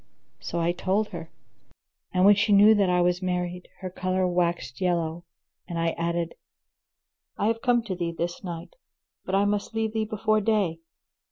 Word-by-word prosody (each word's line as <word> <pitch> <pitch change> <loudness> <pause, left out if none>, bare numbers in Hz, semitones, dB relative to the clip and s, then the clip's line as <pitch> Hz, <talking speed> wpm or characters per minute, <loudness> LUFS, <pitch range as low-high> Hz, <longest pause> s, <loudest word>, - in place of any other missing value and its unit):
So 170 - -4
I 170 +1 +2
told 195 +4 0
her. 165 -2 -7 0.8
And 185 +1 +3
when 205 - +9
she 205 +1 +2
knew 205 +2 +8
that 200 -3 +2
I 180 0 +3
was 180 +1 +1
married, 180 -1 -2
her 185 - -4
colour 185 0 0
waxed 170 -7 -1
yellow, 170 -2 -1 0.4
and 170 -2 -4
I 165 0 +1
added, 170 0 -2 1.0
"I - - 0
have 225 +1 +1
come 240 -1 +2
to 200 -5 -4
thee 170 -1 -2
this 170 +3 -4
night 170 - -7 0.5
but 190 - -1
I 200 +1 +3
must 205 +2 -1
leave 220 -1 -1
thee 220 -1 0
before 215 0 +1
day." 200 -6 +1
180 Hz, 175 wpm, -26 LUFS, 170-205 Hz, 1.0 s, when